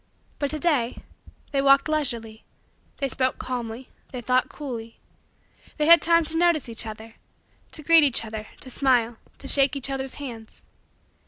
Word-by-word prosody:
But 285 - -1
to 310 - -3
day, 285 -7 0 0.5
they 275 -2 +1
walked 275 +1 +5
leisurely; 235 -8 -2 0.5
they 275 - -1
spoke 260 0 -1
calmly; 245 0 -5 0.2
they 255 - -5
thought 255 +1 +1
coolly; 235 -6 -7 0.8
they 300 - +1
had 335 +2 +8
time 335 0 +4
to 320 +1 -3
notice 340 -5 +2
each 230 -1 -3
other; 220 +1 -10 0.5
to 305 - -3
greet 330 0 +7
each 260 -5 +1
other, 215 0 -7
to 260 - -9
smile, 240 -4 +1 0.2
to 275 - -8
shake 275 0 +4
each 275 0 -3
others' 265 -1 -4
hands. 235 -6 -9
265 Hz, 160 wpm, -24 LUFS, 230-295 Hz, 0.8 s, had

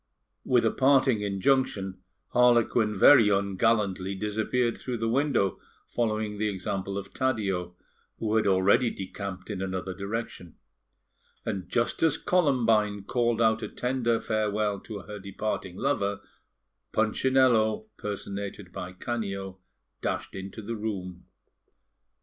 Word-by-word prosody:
With 120 -2 +3
a 115 - +3
parting 130 -4 +3
injunction, 100 -1 0 0.3
Harlequin 120 -3 +3
very 115 +1 +8
ungallantly 100 -1 +1
disappeared 110 +4 0
through 125 -2 -4
the 115 0 -1
window, 120 - +1 0.3
following 110 -3 -2
the 110 0 +1
example 95 0 -3
of 100 -1 -7
Taddeo, 100 -9 -1 0.4
who 110 -1 -1
had 110 -2 +3
already 100 +6 +4
decamped 95 0 -6
in 95 -2 -4
another 95 0 -3
direction; 100 -3 -5 0.9
and 95 -5 -4
just 120 0 0
as 160 -3 +3
Columbine 115 - +2
called 120 +1 0
out 110 0 +3
a - - -3
tender 125 -2 0
farewell 105 -2 0
to 105 0 -8
her 105 0 -8
departing 100 -1 -4
lover, 100 -7 0 0.7
Punchinello 110 -1 +3
(personated 100 -2 -5
by 90 0 -6
Canio) 100 -2 -4 0.4
dashed - - -3
into 95 +3 -7
the 115 +3 -4
room. 95 -5 -5
105 Hz, 120 wpm, -27 LUFS, 100-120 Hz, 0.9 s, very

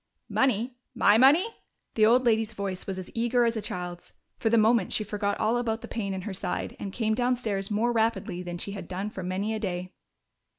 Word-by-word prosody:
"Money? 250 -1 +1 0.2
My 220 -2 +5
money?" 290 - +6 0.5
The 215 -1 +5
old 250 +3 +4
lady's 225 -1 +2
voice 195 -3 -4
was 190 -1 -3
as 185 - -7
eager 240 +1 +2
as 230 0 +1
a 220 - -2
child's. 180 -3 -6 0.2
For 225 - 0
the 230 - +4
moment 220 -2 +3
she 215 - 0
forgot 205 -1 -2
all 225 +3 +2
about 225 -2 -1
the - - -8
pain 200 -4 -3
in 190 - -4
her 205 -1 -4
side 185 -1 -3
and 200 - -5
came 220 +1 0
downstairs 230 -5 0
more 220 +3 +1
rapidly 225 -6 0
than 175 -1 -5
she 200 - -5
had 200 - -7
done 195 +3 -4
for 190 - -6
many 190 +4 -2
a 220 - -2
day. 185 -3 -4
215 Hz, 215 wpm, -27 LUFS, 195-230 Hz, 0.5 s, money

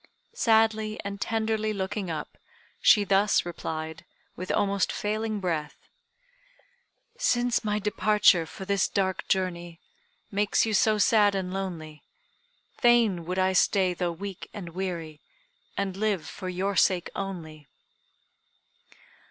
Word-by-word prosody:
Sadly 220 -1 +2
and 200 0 -5
tenderly 220 -1 -1
looking 195 -1 -3
up, 155 -2 -5 0.5
she 210 - +6
thus 200 0 +3
replied, 160 -2 -5 0.3
with 185 +1 -7
almost 200 -1 +1
failing 215 0 -2
breath: 160 -5 -3 1.4
"Since 245 - +1
my 210 -1 0
departure 210 -4 +3
for 190 +4 -9
this 200 0 +1
dark 190 -2 -1
journey, 175 -3 -2 0.5
Makes 205 +2 +2
you 220 - -2
so 215 +1 +3
sad 210 -2 +4
and 185 -1 -3
lonely, 165 -6 -5 0.8
Fain 230 -8 +3
would 180 +2 -3
I 190 0 +2
stay 185 0 +3
though 175 0 -2
weak 195 +2 -7
and 190 -5 -6
weary, 170 -4 -5 0.6
And 195 -2 -2
live 200 -4 -1
for 185 - -6
your 190 +2 -2
sake 180 0 +2
only!" 160 -7 -6
195 Hz, 120 wpm, -27 LUFS, 175-210 Hz, 1.4 s, she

